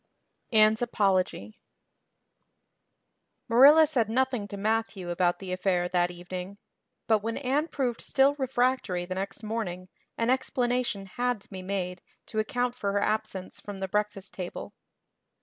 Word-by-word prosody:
Anne's 215 0 +5
Apology 190 - 0 1.9
MARILLA 280 +7 +8
said 250 -8 0
nothing 250 -3 0
to 200 - -7
Matthew 215 -3 -1
about 175 0 +1
the 190 -2 -7
affair 180 -1 +1
that 175 -1 +2
evening; 180 +2 -7 0.5
but 220 -1 +3
when 225 +2 -3
Anne 285 +4 0
proved 250 -7 -2
still 275 +1 +3
refractory 250 -8 0
the 185 - -4
next 195 +3 -5
morning 185 -5 -4 0.3
an 230 +2 +2
explanation 245 -5 0
had 245 +4 -1
to - - -17
be 190 -1 -6
made 185 -1 -3 0.2
to 220 - -3
account 245 +2 0
for 200 -5 -2
her 205 - +2
absence 215 -3 -2
from 205 -1 -7
the 190 0 -3
breakfast 205 -1 -2
table. 180 -2 -6
210 Hz, 140 wpm, -28 LUFS, 185-245 Hz, 1.9 s, MARILLA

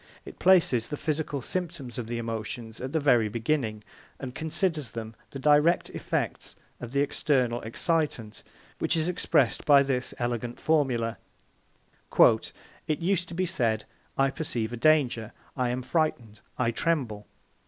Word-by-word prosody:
It - - -11
places 165 -11 +4
the 150 - -4
physical 150 -3 -2
symptoms 165 -9 -4
of 115 - -5
the 120 0 -3
emotions 115 0 -5
at 130 +1 -4
the 160 - +1
very 120 -7 +4
beginning, 115 -1 -1 0.4
and 130 -2 -6
considers 160 - -1
them 115 -1 -6 0.2
the - - -7
direct 150 +5 +3
effects - - -3 0.2
of 120 - -7
the 140 +1 +2
external 130 -4 +1
excitant, 120 -3 -1 0.4
which - - +1
is 160 +1 0
expressed 155 -8 +1
by 140 -2 +6
this 130 -2 -2
elegant 120 0 -3
formula: 130 -8 +1 1.0
"It 155 - +2
used 180 0 0
to 170 - -8
be 185 +2 +1
said, 120 - 0 0.3
'I 135 0 +3
perceive 120 -7 -2
a - - -1
danger; 120 -5 +2 0.2
I 125 -2 0
am 125 +1 -2
frightened, 125 -8 -1 0.2
I 115 -2 +1
tremble.' 115 -8 -1
130 Hz, 145 wpm, -27 LUFS, 115-155 Hz, 1.0 s, by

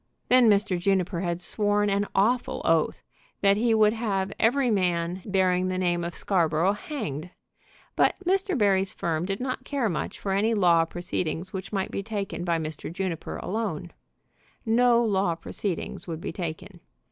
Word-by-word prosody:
Then 250 -2 +6
Mr. 200 -3 +2
Juniper 185 -1 +1
had 175 -2 -2
sworn 205 +2 +1
an 200 0 +1
awful 235 +6 +1
oath 165 -1 +1 0.4
that 200 0 +5
he 225 +2 +2
would 215 -1 +4
have 200 -4 -1
every 250 +2 +3
man 180 -2 0
bearing 185 -2 +2
the 185 0 -1
name 175 -2 0
of 170 0 -4
Scarborough 170 -1 +2
hanged. 180 - -5 0.7
But - - +3
Mr. 385 -1 +1
Barry's 195 -3 +2
firm 170 +1 -2
did 195 0 -2
not 255 0 -3
care 260 -4 -1
much 165 - -4
for 195 - -3
any 215 +4 +2
law 170 -5 +4
proceedings 175 +1 -4
which 190 0 -5
might 195 -2 -2
be - - -2
taken 200 -4 -4
by 170 -2 +1
Mr. 155 -1 -5
Juniper 175 -2 -4
alone. 185 -5 -3 0.7
No 235 +1 +4
law 190 -5 +1
proceedings 175 +2 -4
would 165 -2 -4
be - - -5
taken. 175 +2 -6
195 Hz, 160 wpm, -26 LUFS, 175-215 Hz, 0.7 s, Then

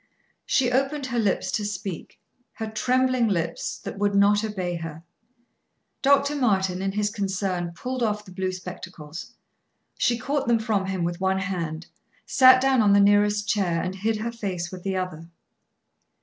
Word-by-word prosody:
She 250 -3 +2
opened 275 +2 0
her 240 -2 -1
lips 205 -4 0
to 210 - -1
speak; 195 -3 -5 0.3
her 220 - -5
trembling 255 +2 +1
lips, 170 -5 -2
that - - -8
would 205 -1 +1
not 205 +1 +4
obey 185 -5 -3
her. 165 -1 -7 1.0
Dr. 280 +1 +3
Martin, 190 -8 +1
in 195 0 -1
his 210 0 0
concern, 190 -4 -2
pulled 255 +7 -4
off 210 -2 -1
the 185 - -13
blue 185 0 -2
spectacles. 180 -3 -9 0.6
She 240 - +2
caught 275 +2 -2
them 235 -1 +4
from 215 -4 -1
him 190 -2 -2
with 170 +1 -3
one 190 0 +2
hand, 175 -4 -3 0.4
sat 255 -1 +7
down 265 -2 +3
on 205 -2 +4
the 200 - +6
nearest 205 +1 +3
chair, 195 -6 +1
and 185 - -3
hid 215 +4 -1
her 225 +2 -3
face 185 -7 -4
with 185 -1 -8
the 190 0 -2
other. 170 -3 -5
200 Hz, 165 wpm, -25 LUFS, 185-230 Hz, 1.0 s, sat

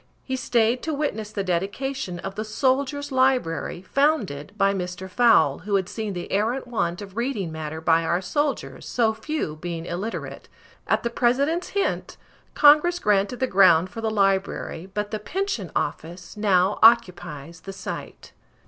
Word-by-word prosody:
He 260 - -3
stayed 240 -1 +1
to 315 -2 -2
witness 220 -8 -3
the 205 -2 -2
dedication 195 +4 -2
of 195 - -5
the 215 - -4
Soldier's 275 +5 0
Library, 255 -10 +1
founded 210 - 0
by 195 0 +3
Mr. 180 0 -5
Fowle, 235 +5 +4
who 205 -1 -2
had 190 -2 +1
seen 220 -3 -4
the 175 -1 -6
arrant 225 +7 0
want 205 -6 -2
of 195 -1 -12
reading 235 -8 -2
matter 160 0 -5
by 165 0 +3
our 170 +2 +1
soldiers 195 - -2
so 225 -2 +1
few 255 - -4
being 170 0 -5
illiterate. 190 +7 -5 0.4
At - - +1
the 235 - -1
President's 280 +9 +1
hint, 400 - -1 0.4
Congress 300 +4 +6
granted 205 - +1
the - - +4
ground 185 -5 +5
for 225 - -6
the 225 - 0
library, 195 -3 0
but 210 +1 -3
the 215 - -2
Pension 300 - -3
Office 170 +5 -4
now 200 -2 +2
occupies 175 -9 +3
the 195 - -7
site. - - -7
210 Hz, 155 wpm, -24 LUFS, 180-255 Hz, 0.4 s, Congress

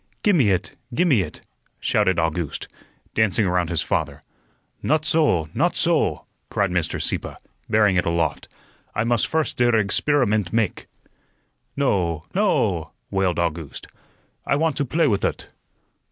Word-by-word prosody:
"Gi' 205 - +5
me 135 - +4
it, 95 0 -1 0.2
gi' 180 - +3
me 135 - +4
it," - - -7 0.4
shouted 95 -4 +1
August, 80 -1 -2 0.5
dancing 110 -1 +2
around 90 -2 0
his 85 - 0
father. - - -2 0.6
"Not 155 +1 +1
soh, 150 - +2
not - - +1
soh," - - +1 0.2
cried 100 -3 0
Mr. 85 -3 -1
Sieppe, - - -2 0.3
bearing 105 -3 +3
it 90 - +1
aloft. 85 -1 -1 0.5
"I 110 - +1
must 115 -1 +2
first 160 -4 -1
der 120 -1 +3
eggsperimunt 110 - +1
make." 115 -4 -1 0.9
"No, 90 - 0
no!" 95 - +1 0.2
wailed 95 -3 +1
August. 85 -3 -3 0.6
"I - - +1
want 160 0 +1
to 140 - 0
play 160 +4 +2
with 100 -6 0
ut." - - -2
100 Hz, 140 wpm, -23 LUFS, 85-135 Hz, 0.9 s, Gi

